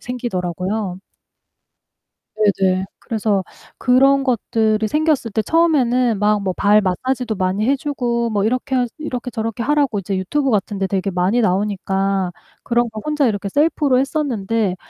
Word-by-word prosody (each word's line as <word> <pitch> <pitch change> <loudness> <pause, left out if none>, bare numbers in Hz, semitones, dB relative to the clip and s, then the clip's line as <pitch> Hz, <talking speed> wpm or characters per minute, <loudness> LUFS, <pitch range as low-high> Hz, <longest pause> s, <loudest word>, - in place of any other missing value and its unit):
생기더라고요. 190 -4 -3 1.4
네네. 190 -3 +2
그래서 215 -4 -1 0.4
그런 270 +2 +4
것들이 220 -3 +1
생겼을 300 -4 +1
때 220 +1 0
처음에는 255 -9 +2
막 210 0 +2
뭐 190 - -1
발 210 +1 +4
마사지도 230 +5 -1
많이 190 +3 0
해 280 - +3
주고 245 -5 -2
뭐 205 -2 0
이렇게 255 +4 -1
해야지 245 -2 0
이렇게 255 -5 -4
저렇게 225 -1 -3
하라고 285 -4 +1
이제 195 0 -3
유튜브 270 +9 0
같은데 200 -2 0
되게 195 0 -1
많이 185 +6 +1
나오니까 195 -2 0 0.3
그런 240 0 +1
거 220 0 -7
혼자 300 -2 +1
이렇게 205 -3 -1
셀프로 290 +1 +2
했었는데 230 -8 -1
220 Hz, 335 characters per minute, -19 LUFS, 195-255 Hz, 1.4 s, 그런